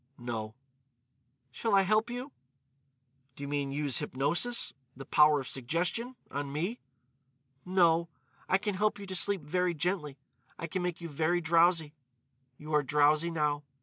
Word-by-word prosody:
"No." 115 -3 -5 1.0
"Shall 220 - 0
I 195 - +5
help 215 +4 +2
you?" 250 +4 -5 1.0
"Do 140 - -9
you - - -4
mean 140 -1 -2
use 145 -2 0
hypnosis—the 135 - -1
power 150 +1 +5
of 130 - -6
suggestion—on 165 - -3
me?" 175 - -2 0.9
"No. 170 -2 +3 0.4
I 190 - +5
can 205 +1 -2
help 210 +2 +1
you 200 - -8
to 190 -1 -4
sleep 195 0 +2
very 180 +3 0
gently. 155 -3 -2 0.4
I - - -4
can 180 +3 -3
make 180 -1 -3
you 170 - -5
very 160 +3 0
drowsy.... 165 -2 +3 0.6
You 155 +1 -8
are 150 - +5
drowsy 150 +3 +3
now.... 150 -3 0
165 Hz, 145 wpm, -30 LUFS, 145-185 Hz, 1.0 s, I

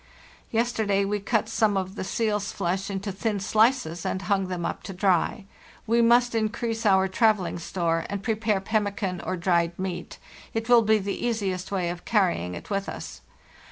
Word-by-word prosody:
" - - -25
Yesterday 220 -4 +1
we 205 +1 -1
cut 215 +2 0
some 220 -2 +2
of 190 0 -2
the 200 - -5
seal's 210 0 -1
flesh 190 +3 -2
into 200 +1 -3
thin 205 +1 -2
slices 215 -4 +2
and 190 - -2
hung 195 0 +1
them 180 -2 -3
up - - -3
to 195 - -7
dry. 190 +2 +1 0.4
We 230 +1 +3
must 240 +1 +4
increase 225 0 -1
our 190 -1 +4
travelling 195 -3 +2
store 165 -1 -1
and 200 0 -4
prepare 215 -3 0
pemmican 200 -3 -1
or 185 - -2
dried 170 -1 +1
meat; 180 -2 -5 0.4
it 225 0 -2
will 240 -1 +7
be 220 0 +4
the 200 -1 -4
easiest 195 -6 -2
way 185 -3 0
of 175 0 -8
carrying 175 - +1
it 85 - -9
with 200 0 -1
us. - - -8
200 Hz, 180 wpm, -26 LUFS, 185-220 Hz, 0.4 s, will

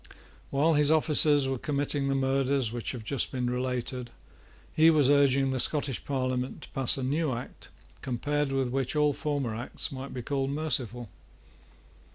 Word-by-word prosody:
While 150 +4 +2
his 150 -1 +4
officers 150 -2 +4
were 135 -2 -2
committing 145 0 -1
the 135 - +1
murders 135 -2 +1
which 120 -1 -4
have 120 -3 -7
just 135 +4 -1
been 125 -2 -2
related, 125 0 -3 0.6
he 160 +1 +6
was 150 -4 +4
urging 140 -1 +3
the 130 - -2
Scottish 140 -2 +1
Parliament 130 -2 -2
to - - -11
pass 135 -1 +1
a 135 - -3
new 150 +3 0
Act 120 +1 -8 0.3
compared 145 +3 -1
with 135 -2 0
which 135 +2 -2
all 150 -1 +3
former 140 -5 -2
Acts 115 +3 -3
might 135 0 -7
be 125 - -6
called 135 +1 -1
merciful. 130 -5 -2
135 Hz, 165 wpm, -28 LUFS, 125-145 Hz, 0.6 s, he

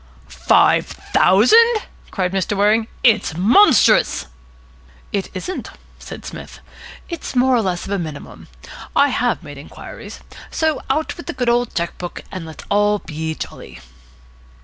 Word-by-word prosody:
"Five - - +4
thousand!" 435 - +4 0.3
cried 185 -3 -2
Mr. 195 +1 -1
Waring. 215 +2 +3 0.2
"It's 215 -9 +3
monstrous." 225 - +4 0.9
"It 195 -1 -2
isn't," 365 - -5 0.3
said - - -10
Psmith. - - -9 0.5
"It's 335 -6 -6
more 255 +1 +3
or 235 - +2
less 180 -4 -2
of - - -7
a 200 - 0
minimum. 155 -4 -8 0.5
I 285 - +4
have 245 -7 -1
made 145 -3 -10
inquiries. 145 - -11 0.3
So 315 -3 -1
out 305 +4 -1
with 340 - -10
the 345 - -3
good 245 -4 -1
old 240 0 0
cheque 170 0 -3
book, 175 -1 -7
and 185 -4 -6
let's 160 - -10
all 205 +1 +3
be 160 -3 -5
jolly." - - -9
205 Hz, 145 wpm, -19 LUFS, 180-260 Hz, 0.9 s, Five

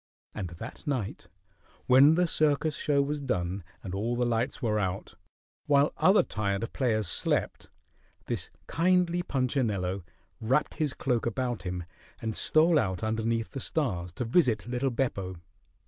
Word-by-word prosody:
And 95 -4 -4
that 85 - -9
night, 125 -9 -3 0.6
when 135 +5 +7
the 180 +1 +3
circus 155 -1 +2
show 140 -2 +2
was 145 +1 -2
done 90 -8 -2 0.2
and 95 - -6
all 110 +5 -1
the 125 0 +1
lights 120 +2 0
were 110 -4 0
out, 95 -1 -3 0.5
while 145 0 +4
other 195 +3 +5
tired 100 +1 -2
players 110 -6 +1
slept, - - -1 0.6
this - - -3 0.2
kindly 175 +1 +2
Punchinello 115 - -1 0.4
wrapped 125 +6 +1
his 150 -4 0
cloak 120 -3 0
about 120 0 -2
him 90 -1 -4 0.4
and 110 -1 -3
stole 160 0 +4
out 95 -5 -2
underneath 110 +1 -1
the 135 - -5
stars 90 - -1
to 125 - -3
visit 120 - +2
little 125 +3 -1
Beppo. 110 -7 -2
120 Hz, 145 wpm, -29 LUFS, 105-145 Hz, 0.6 s, when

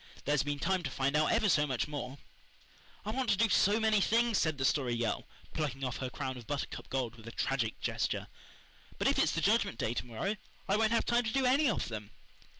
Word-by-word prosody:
There's 145 -1 +2
been 145 0 -2
time 185 +5 0
to 150 - -3
find 135 +2 0
out 155 +1 +3
ever 225 -2 +3
so 150 -5 +3
much 130 -4 -1
more." 145 -2 -5 0.9
"I 215 - -1
want 255 +1 -1
to 200 - +3
do 225 +2 +3
so 205 +2 +4
many 220 -2 +3
things," 230 +1 +3
said 155 -2 +1
the 130 - 0
Story 130 -4 +1
Girl, 115 -3 -1 0.3
plucking 140 -4 -3
off 130 -1 -2
her 130 - -3
crown 130 +1 -4
of 120 - -11
buttercup 145 -1 -4
gold 125 -3 -2
with 110 0 -13
a - - -6
tragic 120 -3 -1
gesture, - - -1 0.7
"but - - +1
if - - +2
it's - - +3
the - - -1
Judgment - - +2
Day 110 - -1
to 120 - -3
morrow 160 - -2 0.3
I 195 - +3
won't 220 +1 +2
have 230 - +2
time 240 0 +2
to 220 - -1
do 270 +1 +1
any 275 +3 +4
of 215 - -1
them." 105 -3 -6
150 Hz, 235 wpm, -32 LUFS, 130-215 Hz, 0.9 s, so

